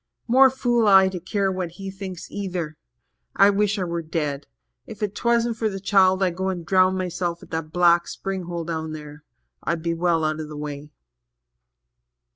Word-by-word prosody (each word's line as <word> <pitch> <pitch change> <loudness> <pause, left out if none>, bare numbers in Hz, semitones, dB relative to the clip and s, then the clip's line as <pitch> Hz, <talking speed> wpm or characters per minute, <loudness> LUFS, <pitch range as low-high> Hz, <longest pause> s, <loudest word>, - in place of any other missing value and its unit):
More 265 +3 +7
fool 240 -4 +1
I 190 -1 +7
to 185 -1 -5
care 195 +2 -1
what 185 -3 -4
he 195 +1 -7
thinks 190 -2 -8
either! 180 -6 -4 0.6
I 200 +1 +6
wish 205 +1 +1
I 190 - -1
were 170 -1 -3
dead. 150 -3 -3 0.4
If - - -9
'twasn't 235 +3 0
for 220 -1 0
the 195 -1 -5
child, 190 -1 +3
I'd 180 -2 0
go 190 0 -1
and 175 -3 -4
drown 185 +1 +3
myself 175 -2 -3
at - - -15
that 160 -1 -4
black 175 0 +4
spring 190 -2 -4
hole 170 -1 -4
down 160 -1 -4
there 150 -1 -10 0.4
I'd 170 -1 -2
be 170 -1 0
well 165 -1 +1
out 155 0 -1
of 155 -1 -6
the 150 - -8
way." 145 0 -6
180 Hz, 185 wpm, -23 LUFS, 165-195 Hz, 0.6 s, More